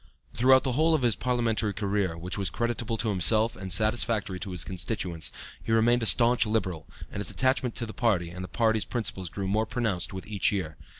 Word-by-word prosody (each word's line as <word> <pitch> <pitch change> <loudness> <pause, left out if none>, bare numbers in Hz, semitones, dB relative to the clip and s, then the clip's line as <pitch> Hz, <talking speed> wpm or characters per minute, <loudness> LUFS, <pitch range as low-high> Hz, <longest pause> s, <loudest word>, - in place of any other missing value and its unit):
Throughout 130 +3 +4
the 130 - -1
whole 160 +5 +3
of 145 - -1
his 120 -3 +2
parliamentary 115 -4 0
career, 100 -5 -1
which 90 +3 -5
was 100 -2 -1
creditable 120 -1 -2
to 110 0 -1
himself 110 +4 +3
and 95 0 -6
satisfactory 110 -3 +2
to 100 - -5
his 90 -4 -1
constituents, 90 -1 -3 0.3
he - - -5
remained 120 +2 +3
a 115 - +1
staunch 120 +1 +5
Liberal, 95 -7 -2 0.2
and - - -6
his 100 - -1
attachment 130 -2 0
to 120 - 0
the 110 - -9
party 90 -8 0
and 90 +1 -7
the - - -6
party's 110 +3 +1
principles 95 -7 -4
grew 95 +2 -5
more 110 +3 0
pronounced 115 -8 -2
with 95 0 -7
each 105 -2 0
year. 90 -6 -3
110 Hz, 205 wpm, -27 LUFS, 95-120 Hz, 0.3 s, staunch